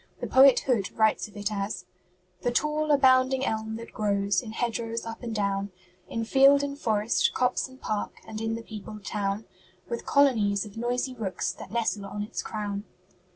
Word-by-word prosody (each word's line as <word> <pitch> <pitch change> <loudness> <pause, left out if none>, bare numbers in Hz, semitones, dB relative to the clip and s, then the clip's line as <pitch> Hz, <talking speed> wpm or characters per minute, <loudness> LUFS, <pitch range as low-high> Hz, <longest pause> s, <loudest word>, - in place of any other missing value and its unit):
The - - -3
poet 265 0 +6
Hood 230 -8 0
writes 220 -1 +3
of 210 0 -14
it 205 +1 -2
as 200 0 -3 0.6
"'The 245 - 0
tall, 305 +3 +1
abounding 260 -2 +4
elm 220 0 -2
that 230 +1 -9
grows 200 -2 +1
In 225 -3 -8
hedgerows 230 0 -2
up 225 0 -7
and 240 - -5
down, 200 -1 -1 0.4
In 230 -1 -2
field 275 +3 +6
and 280 0 -3
forest, 220 -5 +1
copse 250 0 +1
and 260 0 -16
park, 215 -4 -2
And 220 -1 -6
in 225 0 -1
the 230 - -6
peopled 215 -1 -9
town, 200 +1 -2 0.4
With 475 - -4
colonies 220 -8 +3
of 205 - -12
noisy 245 +3 -1
rooks 200 -7 -2
That - - -10
nestle 220 -3 -1
on 205 +1 -4
its 215 - -4
crown.' 205 -2 -4
225 Hz, 180 wpm, -27 LUFS, 205-255 Hz, 0.6 s, poet